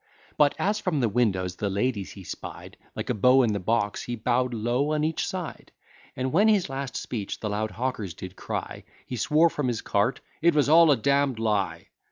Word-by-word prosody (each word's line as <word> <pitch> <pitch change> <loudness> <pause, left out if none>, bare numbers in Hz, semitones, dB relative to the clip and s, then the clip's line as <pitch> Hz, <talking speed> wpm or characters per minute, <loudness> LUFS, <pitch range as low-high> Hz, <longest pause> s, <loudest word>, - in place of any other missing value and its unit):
But, 145 -1 +4
as 210 +2 0
from 180 -7 -1
the 120 - +2
windows 95 -5 0
the 100 - -1
ladies 100 0 -1
he 95 - -11
spied, - - -8 0.2
Like - - -3
a - - +1
beau 125 +5 +5
in 110 -3 +1
the 100 - -1
box, 105 +1 0
he 120 - -4
bow'd 125 +2 0
low 120 +6 0
on 150 0 0
each 160 +1 -1
side! 180 -4 -6 0.4
And 130 +1 -2
when 205 +6 +5
his 205 -7 +3
last 135 0 -4
speech 105 -5 -4
the 105 - -3
loud 110 +1 -1
hawkers 115 -8 -3
did 95 +1 -9
cry, - - -5 0.2
He 125 - -5
swore 155 +8 +3
from 145 -3 -2
his 120 -3 -1
cart, 105 +5 0 0.2
"It 170 0 +4
was 145 -1 +3
all 165 +1 +7
a 140 - +5
damn'd 140 +1 +1
lie!" 105 -3 -1
125 Hz, 210 wpm, -26 LUFS, 105-150 Hz, 0.4 s, all